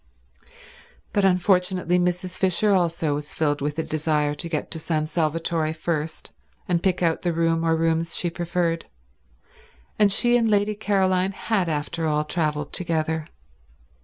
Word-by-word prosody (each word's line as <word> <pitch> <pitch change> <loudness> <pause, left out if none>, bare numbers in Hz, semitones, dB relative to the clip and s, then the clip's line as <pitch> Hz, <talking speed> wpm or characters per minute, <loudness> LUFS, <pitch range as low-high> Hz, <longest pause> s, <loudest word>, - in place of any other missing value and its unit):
But 200 -1 +3
unfortunately 180 -1 +2
Mrs. 180 +1 -1
Fisher 190 +2 +2
also 170 -4 +1
was 150 +1 -5
filled 145 -2 0
with 145 +1 -2
a 160 - 0
desire 150 -1 0
to 160 +3 -6
get 155 -2 -3
to 165 - -5
San 155 -1 -1
Salvatore 160 0 0
first 160 -1 -3 0.4
and 175 -2 +1
pick 180 -1 +1
out 165 -1 +1
the 175 - 0
room 165 0 +1
or 165 -1 +2
rooms 165 +1 +1
she 175 - 0
preferred, 170 -1 -1 1.1
and 205 -1 +5
she 240 +4 +3
and 230 -2 +2
Lady 205 0 +2
Caroline 195 -2 +1
had 195 -3 -1
after 160 +2 -2
all 150 0 +1
traveled 150 -2 -1
together. 160 -2 -1
165 Hz, 150 wpm, -24 LUFS, 155-185 Hz, 1.1 s, and